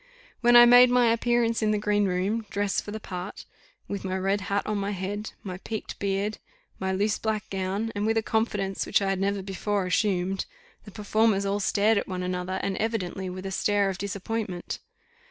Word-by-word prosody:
When 240 Hz, 0 st, +5 dB
I 240 Hz, 0 st, +11 dB
made 245 Hz, +1 st, +8 dB
my 245 Hz, -2 st, +4 dB
appearance 230 Hz, 0 st, +1 dB
in 215 Hz, -, +2 dB
the 215 Hz, -, +2 dB
green 205 Hz, 0 st, +1 dB
room, 195 Hz, +4 st, -1 dB
dressed 200 Hz, 0 st, -1 dB
for -, -, -9 dB
the 215 Hz, +1 st, -5 dB
part, 185 Hz, -1 st, -7 dB, 0.4 s
with 200 Hz, -, -4 dB
my 190 Hz, 0 st, -2 dB
red 195 Hz, +2 st, 0 dB
hat 200 Hz, +1 st, -1 dB
on 210 Hz, -1 st, -1 dB
my 200 Hz, +1 st, -2 dB
head, 205 Hz, +3 st, -4 dB
my 185 Hz, -2 st, -6 dB
piqued 220 Hz, +2 st, -6 dB
beard, 200 Hz, +2 st, -1 dB, 0.4 s
my 190 Hz, 0 st, -1 dB
loose 205 Hz, +2 st, 0 dB
black 215 Hz, -2 st, -2 dB
gown, 195 Hz, +3 st, -2 dB
and 205 Hz, +1 st, -1 dB
with 225 Hz, 0 st, +2 dB
a 225 Hz, -, +1 dB
confidence 205 Hz, -4 st, -1 dB
which -, -, +3 dB
I 195 Hz, -1 st, -1 dB
had 195 Hz, -, -1 dB
never 200 Hz, 0 st, 0 dB
before 195 Hz, +1 st, -2 dB
assumed, 190 Hz, 0 st, 0 dB, 0.4 s
the 205 Hz, -, -10 dB
performers 210 Hz, 0 st, +1 dB
all 200 Hz, +1 st, 0 dB
stared 205 Hz, +2 st, +3 dB
at -, -, -5 dB
one 185 Hz, -1 st, -3 dB
another, 180 Hz, +1 st, -2 dB
and 195 Hz, -1 st, -1 dB
evidently 195 Hz, -4 st, -2 dB
with 185 Hz, +1 st, -7 dB
a 190 Hz, -, -3 dB
stare 200 Hz, 0 st, +1 dB
of 185 Hz, -, -8 dB
disappointment. 200 Hz, -1 st, -4 dB
200 Hz, 200 wpm, -27 LUFS, 190-215 Hz, 0.4 s, I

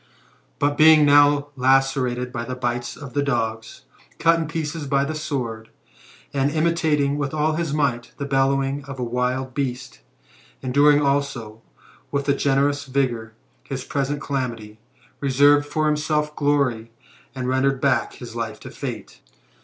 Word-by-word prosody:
But, 145 Hz, 0 st, 0 dB
being 155 Hz, -1 st, +7 dB
now 145 Hz, 0 st, +5 dB
lacerated 130 Hz, -1 st, +1 dB
by 120 Hz, -, -4 dB
the 125 Hz, +2 st, -5 dB
bites 120 Hz, -1 st, -3 dB
of 140 Hz, -4 st, -10 dB
the 145 Hz, -, +1 dB
dogs, 115 Hz, -5 st, -2 dB, 0.3 s
cut 165 Hz, 0 st, +3 dB
in 160 Hz, -, -2 dB
pieces 160 Hz, -1 st, -4 dB
by 140 Hz, 0 st, +2 dB
the 155 Hz, -, -3 dB
sword, 125 Hz, -8 st, -4 dB, 0.6 s
and 140 Hz, 0 st, +1 dB
imitating 155 Hz, -3 st, +1 dB
with 145 Hz, +1 st, -2 dB
all 155 Hz, +1 st, +1 dB
his 165 Hz, -1 st, -2 dB
might 135 Hz, -5 st, -1 dB
the 140 Hz, -, -4 dB
bellowing 135 Hz, 0 st, +1 dB
of 135 Hz, -1 st, -8 dB
a 125 Hz, -, -3 dB
wild 125 Hz, +2 st, -2 dB
beast, 130 Hz, -1 st, -4 dB, 0.6 s
enduring 145 Hz, +3 st, +4 dB
also, 140 Hz, -6 st, -1 dB, 0.5 s
with 140 Hz, 0 st, -2 dB
a 140 Hz, -, +4 dB
generous 140 Hz, +1 st, +1 dB
vigour, 125 Hz, -5 st, -1 dB, 0.3 s
his 135 Hz, -2 st, -5 dB
present 140 Hz, +1 st, -2 dB
calamity, 115 Hz, -6 st, -4 dB, 0.4 s
reserved 145 Hz, +1 st, +4 dB
for 155 Hz, +1 st, 0 dB
him 150 Hz, -, +2 dB
self 150 Hz, 0 st, -1 dB
glory, 140 Hz, -6 st, 0 dB, 0.5 s
and 130 Hz, -1 st, -3 dB
rendered 130 Hz, +1 st, +1 dB
back -, -, +1 dB
his -, -, -10 dB
life -, -, -4 dB
to -, -, -9 dB
fate. -, -, -7 dB
140 Hz, 150 wpm, -22 LUFS, 125-145 Hz, 0.6 s, being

